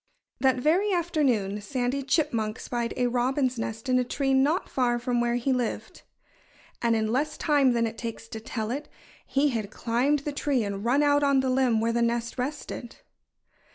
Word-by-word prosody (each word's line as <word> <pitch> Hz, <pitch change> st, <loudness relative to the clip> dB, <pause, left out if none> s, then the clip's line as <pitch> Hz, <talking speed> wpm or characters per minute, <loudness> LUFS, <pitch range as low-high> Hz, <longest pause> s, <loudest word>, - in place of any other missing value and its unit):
That 265 Hz, -1 st, +3 dB
very 345 Hz, +10 st, +2 dB
afternoon 275 Hz, -, 0 dB
Sandy 255 Hz, +4 st, -2 dB
Chipmunk 230 Hz, -7 st, 0 dB
spied 235 Hz, -1 st, -3 dB
a 250 Hz, -, +2 dB
robin's 250 Hz, +1 st, 0 dB
nest 225 Hz, +2 st, -4 dB
in 255 Hz, 0 st, +3 dB
a -, -, +2 dB
tree 270 Hz, +2 st, -1 dB
not 285 Hz, +7 st, +2 dB
far 245 Hz, -2 st, +1 dB
from 240 Hz, 0 st, 0 dB
where 240 Hz, 0 st, +1 dB
he 245 Hz, +2 st, +1 dB
lived. 245 Hz, -3 st, -3 dB, 0.8 s
And 235 Hz, -1 st, +2 dB
in 220 Hz, 0 st, 0 dB
less 280 Hz, +5 st, 0 dB
time 285 Hz, -5 st, +3 dB
than 230 Hz, -1 st, +1 dB
it 225 Hz, 0 st, -5 dB
takes 230 Hz, -1 st, -6 dB
to 225 Hz, -, -6 dB
tell 220 Hz, -1 st, -4 dB
it, 285 Hz, +4 st, -4 dB, 0.4 s
he 280 Hz, +2 st, +2 dB
had 220 Hz, -6 st, -3 dB
climbed 245 Hz, +7 st, +1 dB
the 295 Hz, -, -2 dB
tree 280 Hz, -4 st, 0 dB
and 200 Hz, -1 st, -4 dB
run 260 Hz, +5 st, +3 dB
out 290 Hz, 0 st, +4 dB
on 280 Hz, -2 st, +3 dB
the 260 Hz, -1 st, 0 dB
limb 255 Hz, -4 st, +2 dB
where 230 Hz, +1 st, +1 dB
the 235 Hz, -, +1 dB
nest 235 Hz, +1 st, -1 dB
rested. 255 Hz, -2 st, -5 dB
250 Hz, 190 wpm, -27 LUFS, 230-275 Hz, 0.8 s, out